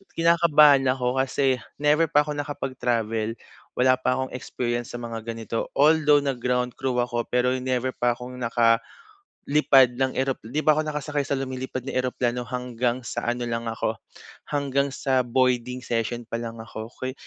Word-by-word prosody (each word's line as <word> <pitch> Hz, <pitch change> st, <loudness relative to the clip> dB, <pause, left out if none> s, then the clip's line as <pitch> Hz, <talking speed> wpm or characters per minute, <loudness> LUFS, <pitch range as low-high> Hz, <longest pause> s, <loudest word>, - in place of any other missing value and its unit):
Kinakabahan 155 Hz, -5 st, +5 dB
ako 125 Hz, 0 st, -1 dB
kasi 130 Hz, 0 st, +1 dB, 0.2 s
never 150 Hz, +2 st, +4 dB
pa 150 Hz, -1 st, +4 dB
ako 150 Hz, -1 st, -4 dB
nakapag-travel, 120 Hz, -6 st, -2 dB, 0.4 s
wala 130 Hz, +1 st, +4 dB
pa 125 Hz, 0 st, +1 dB
akong 130 Hz, 0 st, -2 dB
experience 120 Hz, -1 st, -3 dB
sa 120 Hz, -, -5 dB
mga 115 Hz, -1 st, -5 dB
ganito. 115 Hz, 0 st, -4 dB
Although 150 Hz, 0 st, +5 dB
nag-ground 125 Hz, -2 st, -1 dB
crew 130 Hz, -2 st, -1 dB
ako 120 Hz, -1 st, -2 dB
pero 125 Hz, +1 st, +2 dB
never 130 Hz, 0 st, -1 dB
pa 120 Hz, 0 st, +1 dB
akong 125 Hz, +1 st, -9 dB, 0.9 s
nakalipad 135 Hz, -, +3 dB
ng 130 Hz, -1 st, 0 dB
erop 135 Hz, 0 st, 0 dB
di 130 Hz, +8 st, -2 dB
pa 155 Hz, -, +6 dB
ako -, -, +2 dB
nakasakay 150 Hz, -1 st, -2 dB
sa 140 Hz, -, 0 dB
lumilipad 130 Hz, -1 st, -5 dB
na 135 Hz, -, -4 dB
eroplano, 125 Hz, -1 st, -1 dB
hanggang 125 Hz, 0 st, -2 dB
sa 120 Hz, -, -4 dB
ano 120 Hz, 0 st, -1 dB
lang 115 Hz, 0 st, -3 dB
ako, 115 Hz, -, -2 dB, 0.5 s
hanggang 140 Hz, -1 st, 0 dB
sa 130 Hz, -1 st, +1 dB
boarding 125 Hz, 0 st, +1 dB
session 120 Hz, +1 st, -2 dB
pa 115 Hz, -, -3 dB
lang 115 Hz, -1 st, -6 dB
ako. 110 Hz, 0 st, -8 dB
Kuy 130 Hz, 0 st, -4 dB
125 Hz, 160 wpm, -25 LUFS, 120-140 Hz, 0.9 s, pa